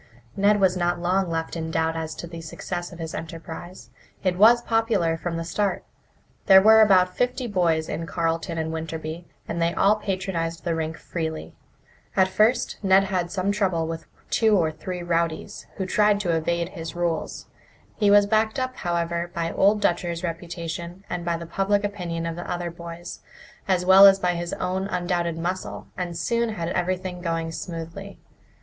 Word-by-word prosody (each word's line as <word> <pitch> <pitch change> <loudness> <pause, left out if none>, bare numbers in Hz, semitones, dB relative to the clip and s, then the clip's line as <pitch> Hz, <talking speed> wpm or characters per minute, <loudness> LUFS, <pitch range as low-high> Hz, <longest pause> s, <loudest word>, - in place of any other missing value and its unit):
Ned 205 +1 +3
was 190 -2 +3
not 175 -1 0
long 180 +1 +1
left 165 0 -3
in 160 -1 -3
doubt 160 0 0
as 160 -1 -4
to - - -7
the 170 -1 -8
success 175 +2 -5
of 175 - -10
his 165 -1 -6
enterprise. 165 +2 -8 0.3
It 185 -2 +1
was 230 +5 +6
popular 225 -8 +1
from 165 +1 -4
the 165 - -3
start. 195 +4 -1 0.6
There 190 -1 +9
were 220 +3 +7
about 185 -3 +5
fifty 250 +1 0
boys 170 -7 +1
in 165 - -4
Carleton 165 0 -1
and 160 0 -2
Winterby, 160 +1 -5 0.2
and 170 - -3
they 170 +1 +1
all 210 +2 +4
patronized 185 -5 -3
the 170 - 0
rink 160 0 -3
freely. 160 -2 -5 0.6
At 190 -1 +4
first 225 +5 +2
Ned 195 -1 +5
had 185 -3 -1
some 190 +2 -1
trouble 190 -5 0
with 165 0 -6 0.2
two 220 -2 +4
or 160 -3 +2
three 175 +3 -6
rowdies, 170 +3 -2
who 190 - -3
tried 210 +1 +3
to 175 -4 +1
evade 170 +1 -1
his 165 -2 -7
rules. 170 -2 -2 0.5
He 205 -2 +2
was 205 0 +7
backed 220 +2 +1
up, 255 0 -2
however, 170 0 -1
by 165 -1 -1
Old 205 +2 +3
Dutcher's 170 -1 0
reputation 170 +1 -5
and 175 - -3
by 170 -1 -1
the 170 - -7
public 195 +4 0
opinion 175 -5 -3
of 165 0 -3
the 175 - -7
other 175 -1 -3
boys, 170 +1 -8 0.5
as 180 -2 +1
well 190 +2 +9
as 195 0 +6
by 180 -2 0
his 175 0 -4
own 185 +1 -2
undoubted 175 -3 -1
muscle, 180 +3 -4
and 175 -2 -4
soon 235 +1 0
had 170 -3 -3
everything 180 0 -2
going 165 -1 -2
smoothly. 170 +4 -7
175 Hz, 180 wpm, -24 LUFS, 165-195 Hz, 0.6 s, There